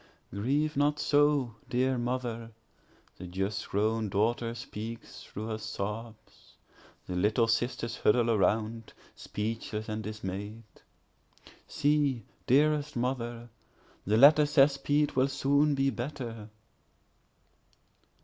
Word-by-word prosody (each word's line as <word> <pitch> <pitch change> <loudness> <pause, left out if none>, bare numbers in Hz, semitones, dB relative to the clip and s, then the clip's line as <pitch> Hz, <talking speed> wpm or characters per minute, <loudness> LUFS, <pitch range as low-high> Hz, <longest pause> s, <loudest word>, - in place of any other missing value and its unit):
Grieve 140 +9 0
not 145 +1 +2
so, 145 -5 +2 0.2
dear 130 +2 +1
mother, 120 -2 -3 0.7
(the 90 - -8
just 95 +3 -3
grown 110 +1 0
daughter 115 +4 0
speaks 115 -1 -8
through 105 - -7
her 110 -1 -3
sobs; 110 +2 -7 0.5
The 90 - -5
little 105 +5 +2
sisters 115 0 -1
huddle 120 +1 +3
around, 110 +1 0 0.2
speechless 110 0 -4
and 110 0 -3
dismay'd;)See, 110 +6 -4 0.2
dearest 150 +2 +3
mother, 120 -1 -3 0.5
the 105 +3 +1
letter 150 +4 +7
says 140 -1 +5
Pete 145 +1 +1
will 130 +1 +3
soon 140 +1 +2
be 135 0 +2
better. 120 -3 -6
115 Hz, 100 wpm, -29 LUFS, 110-135 Hz, 0.7 s, letter